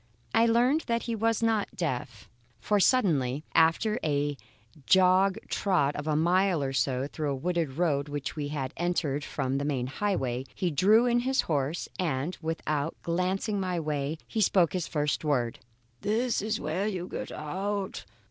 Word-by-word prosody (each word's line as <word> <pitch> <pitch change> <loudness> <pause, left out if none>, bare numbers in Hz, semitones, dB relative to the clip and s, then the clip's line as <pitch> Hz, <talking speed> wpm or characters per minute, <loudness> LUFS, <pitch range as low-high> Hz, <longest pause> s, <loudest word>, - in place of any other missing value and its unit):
I 225 +1 +5
soon 230 - +2
learned 255 +7 +3
that 235 0 0
he 235 - -3
was 225 +1 0
not 225 -2 +1
deaf; 125 - -4 0.3
for 210 -1 +1
suddenly, 155 - +2
after 190 +8 +3
a 145 -1 0 0.5
jog 190 +1 +5
trot 150 -8 +1
of 145 +1 -5
a 155 - +1
mile 175 0 +2
or 135 0 -2
so 130 +1 0
through 150 +1 -3
a 140 - 0
wooded 165 0 -1
road 150 -4 +1
which 145 -2 -4
we 150 -2 -3
had 140 -3 -4
entered 160 -5 -1
from 135 +1 -2
the - - -2
main 140 -4 -1
highway, 130 -5 -2
he 180 -3 -1
drew 210 - +5
in 240 0 +3
his 265 +2 +1
horse, 150 +1 -1
and, 160 -1 -1
without 160 -1 -2
glancing 185 +4 -1
my 180 -2 -1
way, 150 -1 -2
spoke 190 -6 +2
his 180 -3 -2
first 150 0 -1
word: 125 -6 0 0.4
"This 225 - 0
is 215 +1 -1
where 165 +7 -1
you 185 -4 -3
get - - -5
out. 190 +6 -3
170 Hz, 165 wpm, -28 LUFS, 145-200 Hz, 0.5 s, I